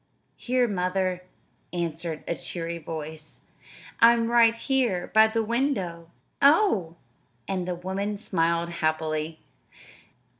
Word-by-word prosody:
"Here, 250 Hz, 0 st, +1 dB
mother," 185 Hz, -2 st, -1 dB, 0.5 s
answered 165 Hz, -2 st, -4 dB
a -, -, 0 dB
cheery 170 Hz, 0 st, -5 dB
voice. 155 Hz, 0 st, -8 dB, 0.6 s
"I'm 230 Hz, 0 st, +5 dB
right 230 Hz, -1 st, +5 dB
here 230 Hz, -7 st, 0 dB
by 220 Hz, +1 st, +7 dB
the 225 Hz, 0 st, -1 dB
window." 210 Hz, -, -1 dB, 0.3 s
"Oh!" 280 Hz, -, +4 dB, 0.5 s
And 185 Hz, -2 st, -2 dB
the 180 Hz, -, -2 dB
woman 195 Hz, +4 st, -3 dB
smiled 170 Hz, -4 st, 0 dB
happily. 155 Hz, -1 st, -2 dB
180 Hz, 105 wpm, -26 LUFS, 165-230 Hz, 0.6 s, by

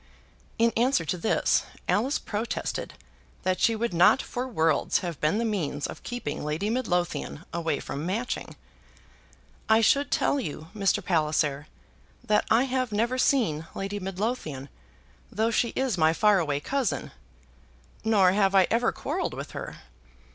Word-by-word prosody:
In 230 Hz, 0 st, +3 dB
answer 240 Hz, -7 st, +2 dB
to 155 Hz, -, -1 dB
this, 180 Hz, +5 st, +2 dB, 0.3 s
Alice 260 Hz, +8 st, +2 dB
protested 220 Hz, +2 st, -4 dB, 0.5 s
that 185 Hz, 0 st, 0 dB
she 230 Hz, -, +3 dB
would 230 Hz, -2 st, -2 dB
not 175 Hz, +9 st, +5 dB
for 250 Hz, 0 st, -4 dB
worlds 160 Hz, -, +1 dB
have 170 Hz, -5 st, -5 dB
been 155 Hz, +7 st, +2 dB
the 235 Hz, -, 0 dB
means 165 Hz, -9 st, -2 dB
of -, -, -7 dB
keeping 240 Hz, -12 st, -5 dB
Lady 155 Hz, +8 st, -1 dB
Midlothian 180 Hz, -, -2 dB
away 165 Hz, -3 st, -1 dB
from 140 Hz, +2 st, -5 dB
Matching. 215 Hz, +8 st, -3 dB, 1.1 s
"I 220 Hz, 0 st, +6 dB
should 280 Hz, +5 st, +3 dB
tell 285 Hz, -, +1 dB
you, 160 Hz, -, -6 dB
Mr. 200 Hz, -1 st, +1 dB
Palliser, 150 Hz, -4 st, +1 dB, 0.6 s
that 215 Hz, -3 st, +2 dB
I 225 Hz, +3 st, +5 dB
have 255 Hz, -2 st, -1 dB
never 235 Hz, +5 st, 0 dB
seen 165 Hz, -, +2 dB
Lady 195 Hz, +1 st, -3 dB
Midlothian, 185 Hz, -, -3 dB, 0.6 s
though 225 Hz, +2 st, +1 dB
she 235 Hz, +1 st, +1 dB
is 255 Hz, -8 st, 0 dB
my 160 Hz, 0 st, +4 dB
far 210 Hz, +2 st, +4 dB
away 145 Hz, -4 st, -1 dB
cousin. 270 Hz, -, -2 dB, 0.9 s
Nor 205 Hz, -5 st, +4 dB
have 195 Hz, 0 st, +2 dB
I 190 Hz, -1 st, +7 dB
ever 235 Hz, +1 st, +2 dB
quarrelled -, -, -3 dB
with -, -, -7 dB
her. -, -, -7 dB
200 Hz, 145 wpm, -27 LUFS, 165-235 Hz, 1.1 s, I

